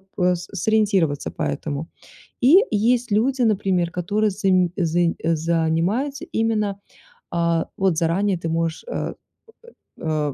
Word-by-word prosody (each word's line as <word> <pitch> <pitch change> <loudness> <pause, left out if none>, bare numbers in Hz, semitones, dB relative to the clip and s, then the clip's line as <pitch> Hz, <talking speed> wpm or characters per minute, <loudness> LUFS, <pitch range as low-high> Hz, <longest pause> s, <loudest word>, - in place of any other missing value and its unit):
п 180 -2 +2
сориентироваться 190 -4 0
по - - -4
этому. 145 +2 -3 0.5
И 275 +8 +7
есть 235 +2 +1
люди, 255 +5 +1
например, 190 -5 +1
которые 205 +5 0
зам 185 -3 +2
зан 170 -2 +1
занимаются 165 - 0
именно, 215 -5 0 0.5
а, 170 -1 0
вот 190 -4 +1
заранее 180 +4 +1
ты 165 -1 -4
можешь, 165 0 -2
э, - - -3 0.9
э, 150 -3 -1
180 Hz, 115 wpm, -22 LUFS, 165-215 Hz, 0.9 s, И